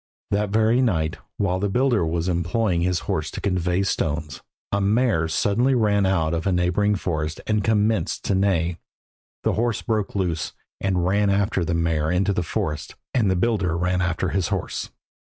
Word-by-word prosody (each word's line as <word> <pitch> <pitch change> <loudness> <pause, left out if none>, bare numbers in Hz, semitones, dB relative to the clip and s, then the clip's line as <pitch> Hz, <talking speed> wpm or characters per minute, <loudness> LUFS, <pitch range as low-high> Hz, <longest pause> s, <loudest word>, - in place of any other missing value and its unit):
That 105 0 +1
very 110 +4 +3
night, 80 -10 0 0.2
while 95 -2 0
the 100 +1 0
builder 125 -2 +2
was 85 +1 -1
employing 90 +2 0
his 90 -1 +1
horse - - -2
to - - -6
convey 90 -1 0
stones, 75 -7 -2 0.3
a 100 - +1
mare 105 -5 +2
suddenly 110 +10 +2
ran 100 -4 +2
out 85 -4 +1
of 85 +2 -1
a - - +2
neighbouring 90 +4 +2
forest 80 -5 -2
and 105 -1 +1
commenced 110 0 +1
to - - 0
neigh. 90 -3 +1 0.7
The - - +2
horse 115 -1 0
broke 110 -4 -1
loose 90 -5 -1 0.3
and 90 -3 0
ran 100 +2 +2
after 100 -2 +1
the 85 0 -1
mare 80 -2 +1
into 95 +3 +1
the 90 - 0
forest, 75 -2 -3 0.2
and 115 -6 +2
the 95 - +2
builder 95 -4 +1
ran 90 +1 0
after 90 0 0
his 95 -2 0
horse. - - -3
95 Hz, 175 wpm, -23 LUFS, 85-105 Hz, 0.7 s, very